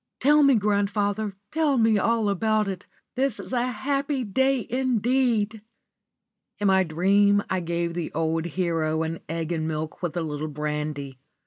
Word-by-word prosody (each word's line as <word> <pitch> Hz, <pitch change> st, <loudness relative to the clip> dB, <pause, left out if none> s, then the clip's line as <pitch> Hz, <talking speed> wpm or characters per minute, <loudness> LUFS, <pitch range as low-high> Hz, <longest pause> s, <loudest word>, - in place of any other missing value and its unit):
"Tell 295 Hz, +3 st, +5 dB
me, 275 Hz, -2 st, +6 dB
grandfather, 205 Hz, 0 st, 0 dB, 0.2 s
tell 310 Hz, -4 st, +2 dB
me 225 Hz, -2 st, +4 dB
all 230 Hz, +1 st, +1 dB
about 215 Hz, +2 st, +1 dB
it. 190 Hz, 0 st, -5 dB, 0.3 s
This 265 Hz, -3 st, -1 dB
is -, -, -8 dB
a 245 Hz, 0 st, +1 dB
happy 275 Hz, +3 st, -1 dB
day 265 Hz, +2 st, +1 dB
indeed!" 240 Hz, -3 st, +1 dB, 1.0 s
In 205 Hz, -, -3 dB
my 190 Hz, 0 st, +4 dB
dream 200 Hz, +5 st, +3 dB
I 190 Hz, -, +1 dB
gave 170 Hz, 0 st, -2 dB
the 170 Hz, -2 st, -4 dB
old 160 Hz, +1 st, 0 dB
hero 165 Hz, -3 st, -1 dB
an 165 Hz, +1 st, -4 dB
egg 165 Hz, 0 st, -3 dB
and 160 Hz, -2 st, -1 dB
milk 155 Hz, 0 st, -4 dB
with 175 Hz, -1 st, -3 dB
a -, -, 0 dB
little 155 Hz, -1 st, -3 dB
brandy. 150 Hz, -2 st, -4 dB
200 Hz, 155 wpm, -25 LUFS, 165-235 Hz, 1.0 s, me